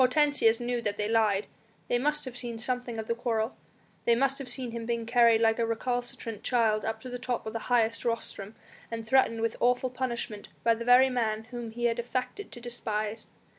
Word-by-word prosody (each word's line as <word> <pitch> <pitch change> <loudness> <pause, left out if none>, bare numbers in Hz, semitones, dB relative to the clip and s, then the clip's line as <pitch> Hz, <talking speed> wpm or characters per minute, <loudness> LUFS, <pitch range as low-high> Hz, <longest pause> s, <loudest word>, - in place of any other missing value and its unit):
Hortensius 255 -4 +4
knew 240 0 -1
that 205 -2 -2
they 210 - -1
lied, 215 -3 +2 0.4
they 240 - +1
must 295 +3 0
have 255 -2 -7
seen 240 -2 -3
something 245 0 0
of 220 - -3
the 230 - 0
quarrel; 230 -1 -1 0.5
they 235 - +5
must 275 +3 +1
have 270 -2 -6
seen 245 -1 -1
him 230 0 -5
being 235 -1 -1
carried 235 -1 +5
like 225 0 +3
a - - +3
recalcitrant 230 -1 -3
child 220 -3 +2
up 220 0 -2
to 255 - -7
the 245 - -4
top 250 -1 -2
of 220 - -5
the 230 - -2
highest 230 -2 +2
rostrum, 225 -3 -3 0.3
and 230 -1 -5
threatened 230 -1 +3
with 230 0 0
awful 250 +1 +2
punishment 235 -5 -4
by 230 - +5
the 230 +1 -4
very 255 +2 +6
man 220 -3 0
whom 240 -2 -5
he 240 +2 -3
had 235 0 +1
affected 255 - -3
to - - -8
despise. 220 -2 -3
235 Hz, 210 wpm, -29 LUFS, 225-245 Hz, 0.5 s, very